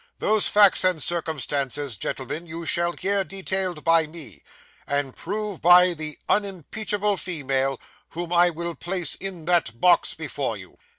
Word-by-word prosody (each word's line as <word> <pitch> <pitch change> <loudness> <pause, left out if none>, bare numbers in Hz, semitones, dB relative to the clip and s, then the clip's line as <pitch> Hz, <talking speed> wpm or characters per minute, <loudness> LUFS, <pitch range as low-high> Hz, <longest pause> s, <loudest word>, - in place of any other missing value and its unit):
Those 215 -1 +2
facts 205 -2 +6
and 185 -3 +2
circumstances, 145 -5 -2
gentlemen, 135 - -5
you 165 +1 -7
shall 170 +1 +1
hear 195 +2 -1
detailed 190 -3 -3
by 165 -1 +3
me, 150 - -10 0.5
and 140 -2 -2
proved 210 -3 -5
by 180 +1 +6
the 155 -2 -6
unimpeachable 205 +1 -1
female 135 -7 -1 0.3
whom 175 +1 -5
I 175 0 +5
will 170 0 -5
place 175 -2 -1
in 185 -4 -7
that 165 -10 +1
box 175 +3 +3
before 140 -7 -4
you. 95 -2 -14
170 Hz, 140 wpm, -24 LUFS, 145-185 Hz, 0.5 s, facts